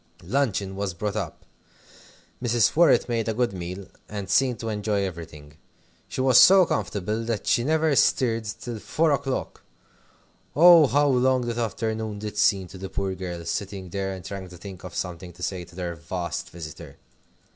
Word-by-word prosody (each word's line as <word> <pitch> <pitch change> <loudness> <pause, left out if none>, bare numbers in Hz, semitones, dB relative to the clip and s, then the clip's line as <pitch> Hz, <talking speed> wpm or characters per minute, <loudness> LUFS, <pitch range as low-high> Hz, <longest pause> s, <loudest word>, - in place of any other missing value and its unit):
Luncheon 100 -3 -1
was 100 -2 -3
brought 105 +3 -3
up. - - -5 1.0
Mrs. 120 -3 +2
Worrett 170 +1 +5
made 115 -2 -1
a 110 - -1
good 120 -3 0
meal, 90 +2 -6 0.2
and 100 -2 -5
seemed 125 +1 +3
to 115 - -4
enjoy 105 -1 -1
everything. 80 -5 -8 0.5
She - - -3
was 130 -2 +6
so 185 +7 +8
comfortable 105 - -2
that 115 -2 -2
she 120 - +2
never 155 +1 +2
stirred 115 -4 +2
till 110 +2 -6
four 160 +8 +1
o'clock! 135 -2 -2 0.9
Oh, 170 -1 +8
how 145 +3 +3
long 130 -1 +3
that 120 -1 -3
afternoon 110 -1 -2
did 105 0 -6
seem 95 -3 +3
to 95 - -11
the 95 0 -6
poor 95 0 -2
girls, 90 -2 -5
sitting 95 -2 -5
there 95 +1 -3
and 95 - -11
trying 95 -2 -6
to 90 - -12
think 95 0 -10
of 90 -1 -9
something 90 0 -5
to 90 +1 -11
say 90 -2 -3
to 85 +1 -18
their 90 -2 -4
vast 85 +1 -5
visitor! 80 -3 -10
105 Hz, 175 wpm, -25 LUFS, 90-120 Hz, 1.0 s, so